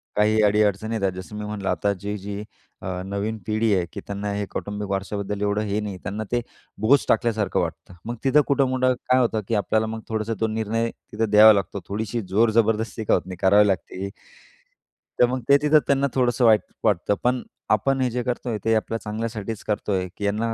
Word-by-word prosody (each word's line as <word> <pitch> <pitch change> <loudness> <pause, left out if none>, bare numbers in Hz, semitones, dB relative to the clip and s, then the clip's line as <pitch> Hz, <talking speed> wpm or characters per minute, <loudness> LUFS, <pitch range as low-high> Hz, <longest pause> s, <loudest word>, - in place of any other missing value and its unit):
काही 110 +1 +3
अडी-अडचणी 105 +1 +2
येतात 100 -3 0
जसं 100 +4 -8
मी 105 - -4
म्हणलं 105 -2 -4
आता 90 +3 +1
जी-जी 100 0 -5 0.4
अ, 90 -1 -3
नवीन 100 +3 -3
पिढी 110 0 +1
आहे, 90 -2 0
की - - -5
त्यांना 100 0 -3
हे 100 0 -2
कौटुंबिक 105 0 -4
वारशाबद्दल 100 +1 -3
एवढं 105 +1 +1
हे 100 +1 -1
नाही. 100 -3 -5
त्यांना 105 +4 -3
ते 120 0 +1 0.4
बोज 135 +6 +4
टाकल्यासारखं 110 -4 +1
वाटतं. - - -4
मग 120 +1 -3
तिथं 140 0 +3
कुठं-कुठं 130 0 +2 0.2
काय 130 0 +5
होतं, 115 -3 +1
की 115 - 0
आपल्याला 110 +2 +1
मग 110 0 -4
थोडंसं 110 0 -1
तो 110 - +1
निर्णय 110 +1 -1 0.2
तिथं 110 0 -1
द्यावा 110 +1 +9
लागतो. 100 0 -2
थोडीशी 110 +3 -3
जोर-जबरदस्ती 110 +1 +2
का - - +3
होत 90 - +3
नाही 95 -1 -7
करावी 100 +2 +5
लागते. 95 0 -2 1.1
तर 125 - +7
मग 130 0 -2
ते 140 - +8
तिथं 150 +1 +5
त्यांना 140 0 +2
थोडंसं 125 -1 +2
वाईट 110 -2 +6 0.2
वाटतं. 105 -2 +2
पण 125 0 +1 0.3
आपण 130 +6 +2
हे 125 - +2
जे 125 0 -2
करतोय 120 -2 -2
ते 115 - +3
आपल्या 115 +1 -1
चांगल्यासाठीचं 110 0 -5
करतोय 100 -3 -1
की 100 - -3
यांना 110 +3 0
110 Hz, 190 wpm, -23 LUFS, 100-115 Hz, 1.1 s, द्यावा